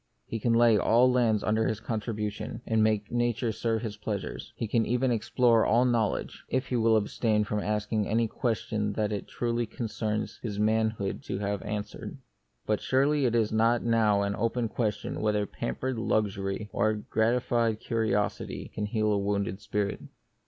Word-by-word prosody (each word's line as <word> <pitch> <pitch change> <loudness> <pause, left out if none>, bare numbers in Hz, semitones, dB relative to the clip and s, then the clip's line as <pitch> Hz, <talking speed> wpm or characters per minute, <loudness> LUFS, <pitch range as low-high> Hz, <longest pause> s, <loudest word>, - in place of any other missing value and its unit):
He 115 - -4
can 115 +2 +1
lay 115 -2 +5
all 120 +5 +4
lands 115 -4 +2
under 110 +1 +1
con 110 +1 -3
tribution, 105 +1 -4
and 110 -1 +2
make 110 -1 +1
Nature 120 -1 0
serve 115 +1 -1
his 105 -2 -4
pleasures; 105 -2 -5
he 115 - -3
can 115 +2 +2
even 125 +3 +1
explore 115 0 +3
all 120 +4 +3
knowledge 115 -4 0
— - - -34
if 130 +1 -1
he 125 - 0
will 115 -1 +4
abstain 105 0 +1
from 105 0 -2
asking 105 +1 -1
any 115 +2 +2
question 110 -2 -1
that 105 0 -1
it 105 -2 -3
truly 120 -1 -1
concerns 110 -2 -3
his 105 -4 -4
manhood 110 -1 0
to - - -3
have 100 -1 -2
answered. 105 -1 -5 0.5
But 105 -1 0
surely 140 +2 +2
it 120 -1 +1
is 110 -2 +2
not 115 +2 +3
now 110 -3 +3
an 100 0 -1
open 115 +1 -1
question 105 -3 -2
whether 105 -1 +1
pampered 115 - -3
luxury 100 -2 -1
or 110 - +2
gratified 115 +1 +1
curiosity 110 -4 -1
can 105 -1 -2
heal 110 0 +1
a 100 - +2
wounded 100 -1 -1
spirit. 105 -1 -2
110 Hz, 170 wpm, -28 LUFS, 105-115 Hz, 0.5 s, lay